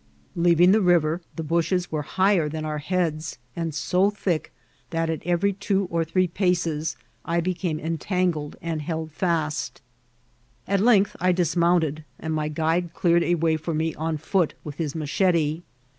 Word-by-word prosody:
Leaving 175 +1 +5
the 215 +2 +4
river, 170 -2 +3
the 160 - -4
bushes 170 +3 0
were 155 -1 -1
higher 185 +1 +2
than 155 +1 -4
our 150 -1 -2
heads, 160 -1 -2 0.2
and 165 -3 -3
so 185 +5 +2
thick 190 -5 -2 0.4
that 165 -1 -1
at 160 - -4
every 175 +3 +2
two 195 -1 0
or 165 0 +1
three 180 +3 +1
paces 170 -4 0 0.3
I 170 +1 0
became 170 -2 -1
entangled 165 -1 -1
and 165 -2 -2
held 160 0 -4
fast; 155 -3 -1 0.9
at 200 0 +2
length 210 -3 +4
I 185 +1 +3
dismounted, 170 -3 +1
and 160 0 -4
my 155 -1 -1
guide 165 +3 -1
clear 170 -1 +3
ed 170 - +3
a 175 - +2
way 160 -1 +1
for 160 +1 -3
me 160 +1 0
on 160 0 -2
foot 165 +2 0
with 145 -2 -7
his 155 -3 -3
machete. 160 0 +1
165 Hz, 165 wpm, -24 LUFS, 155-180 Hz, 0.9 s, Leaving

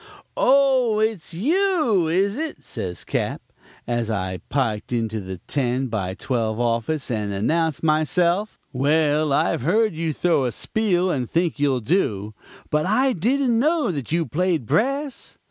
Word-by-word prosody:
"'Oh, 260 -4 +3
it's 215 -6 -1
you, 300 - +2
is 195 +5 +1
it?' 315 +2 -5
says 90 -2 -6
Cap., - - -2 0.5
as 120 -2 -1
I 95 -3 -2
piked 115 -7 -1
into 110 -2 -1
the 95 -1 -6
ten 130 -1 -1
by 95 -4 -3
twelve 115 -3 -2
office 120 +5 -1
and 105 -3 -2
announced 155 +11 0
myself. 170 +6 +1
'Well, 150 +2 +2
I've 135 - +1
heard 210 - +2
you 160 0 -2
throw 160 -3 +1
a 125 - 0
spiel 185 - 0
and 125 -6 -2
think 170 -2 0
you'll 135 -3 +1
do. 110 - 0 0.4
But 150 +3 +1
I 255 +6 +2
didn't 240 - +1
know 305 - +2
that 140 -6 -5
you 165 0 +1
played 165 0 0
brass. 275 - -1
160 Hz, 145 wpm, -23 LUFS, -, 0.5 s, Oh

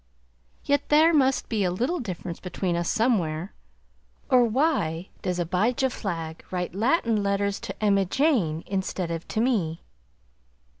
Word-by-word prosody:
Yet 285 0 +1
there 315 +3 +5
must 270 -3 +2
be 215 -4 0
a 180 - +2
little 250 - -1
difference 180 - -5
between 180 -1 -2
us 170 0 -1
somewhere, 190 -8 0 0.8
or 250 -2 +6
why 220 - 0
does 180 -1 -2
Abijah 215 +10 +1
Flagg 165 -7 -5
write 180 -2 -3
Latin 230 - +1
letters 200 0 0
to - - -7
Emma 200 -2 +3
Jane, 190 - +1
instead 190 -2 -2
of 165 0 -5
to - - -2
me? 200 -10 0
200 Hz, 140 wpm, -26 LUFS, 175-250 Hz, 0.8 s, or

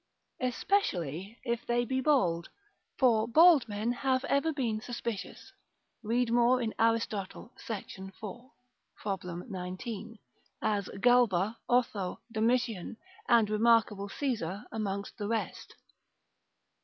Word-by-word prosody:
Especially 210 - -1
if 235 -2 -2
they 240 0 +1
be 260 +1 -1
bald, 180 - +2 0.5
for 230 -4 +4
bald 310 0 +6
men 210 +3 -1
have 260 +1 0
ever 280 +3 +1
been 235 -7 -1
suspicious 235 -3 -6 0.5
(read 235 +1 0
more 240 +2 +4
in 230 -3 -2
Aristotle, 225 -1 -1
Sect. 205 -3 -7 0.2
4. 240 +5 -8 0.4
prob. 195 -3 -3
19.) 185 +5 -6 0.4
as 205 -3 -1
Galba, 230 -4 +3
Otho, 225 -7 +1
Domitian, 225 -2 0 0.3
and 230 -3 +5
remarkable 215 -2 +3
Caesar 215 - -2
amongst 200 -2 -4
the 205 - -2
rest. 225 0 -3
225 Hz, 105 wpm, -30 LUFS, 200-245 Hz, 0.5 s, bald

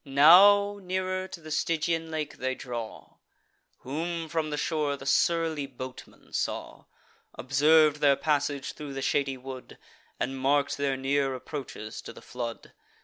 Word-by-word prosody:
Now 200 +9 +6
nearer 185 0 -2
to 180 - -9
the 155 -1 -10
Stygian 165 +1 0
lake 155 -2 -4
they 130 +1 -2
draw: 120 -4 -7 0.6
Whom, 165 +4 -4
from 160 -2 -1
the 150 - -3
shore, 150 -2 -1
the 135 - -11
surly 160 -1 +1
boatman 130 -1 -10
saw; - - -3 0.5
Observ'd 150 +5 +4
their 145 -2 +4
passage 145 -2 -1
thro' 145 -2 -8
the 135 0 -4
shady 135 -2 0
wood, 130 0 -9 0.4
And 135 +1 -2
mark'd 140 +2 +1
their 140 -2 0
near 135 0 0
approaches 125 -5 -7
to - - -9
the - - -13
flood. 120 -2 -6
145 Hz, 145 wpm, -28 LUFS, 135-160 Hz, 0.6 s, Now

